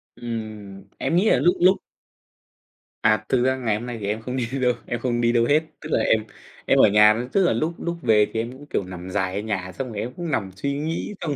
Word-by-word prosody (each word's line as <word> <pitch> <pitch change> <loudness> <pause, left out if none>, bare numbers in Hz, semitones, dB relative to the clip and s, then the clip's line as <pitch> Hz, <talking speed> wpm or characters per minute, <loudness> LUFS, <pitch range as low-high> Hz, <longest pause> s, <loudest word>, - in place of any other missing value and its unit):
Ừm, 110 -4 -7
em 165 - -1
nghĩ 195 +5 +4
là - - +4
lúc 175 - +3
lúc 185 +2 +6 1.2
À, 110 0 +2
thực 125 -2 +2
ra 130 0 +2
ngày 115 -5 0
hôm 120 - -7
nay 120 -2 -5
thì 100 - -4
em 110 +2 -2
không 125 +3 -5
đi 120 -2 -1
đâu, 125 -1 +3
em 120 - -3
không 120 -1 -1
đi 120 0 +3
đâu 120 -1 +3
hết, 150 +4 +4 0.2
tức 155 - -8
là - - +3
em 110 -1 +2 0.4
em - - +3
ở - - +7
nhà, 105 +3 +5
tức 195 - +4
là - - +3
lúc 165 +2 -1
lúc 170 0 -3
về 110 -4 +4
thì 110 - -1
em 115 +2 -3
cũng, 135 +3 -12
kiểu, - - -1
nằm 90 0 -8
dài 95 -1 -1
ở - - -1
nhà 95 -4 -3
xong 130 +7 -5
rồi 100 - -4
em 125 +2 -4
cũng 170 -1 -5
nằm 100 -7 -1
suy 140 +8 -2
nghĩ, 165 +6 -3
xong 150 -4 -2
120 Hz, 260 wpm, -23 LUFS, 105-140 Hz, 1.2 s, ở